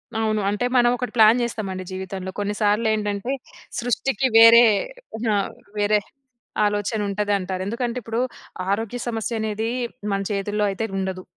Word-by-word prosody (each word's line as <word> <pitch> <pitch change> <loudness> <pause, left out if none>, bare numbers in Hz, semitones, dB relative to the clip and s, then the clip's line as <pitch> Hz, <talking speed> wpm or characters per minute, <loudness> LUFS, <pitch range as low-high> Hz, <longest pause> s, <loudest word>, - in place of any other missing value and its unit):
అవును. 215 -1 0
అంటే 205 +4 -1
మనం 240 -1 +5
ఒకటి 245 -2 -4
ప్లాన్ 225 +2 +6
చేస్తాం 225 -3 -3
అండి 185 0 -5
జీవితంలో 190 0 -5
కొన్ని 205 0 -1
సార్లు 210 +2 +2
ఏంటంటే 210 +2 -2 0.5
సృష్టికి 260 +3 0
వేరే 230 +1 +9 0.7
ఆ! - - +3 0.4
వేరే 210 +1 +3 0.7
ఆలోచన 205 +1 -1
ఉంటది 205 +1 -1
అంటారు. 185 0 -4
ఎందుకంటే 235 +3 -2
ఇప్పుడు 225 +1 -3 0.5
ఆరోగ్య 225 +4 -1
సమస్య 225 0 -2
అనేది 220 0 -2 0.4
మన 195 0 0
చేతుల్లో 205 +1 -1
అయితే 210 +3 -3
ఉండదు. 190 -1 -3
210 Hz, 145 wpm, -23 LUFS, 200-230 Hz, 0.7 s, వేరే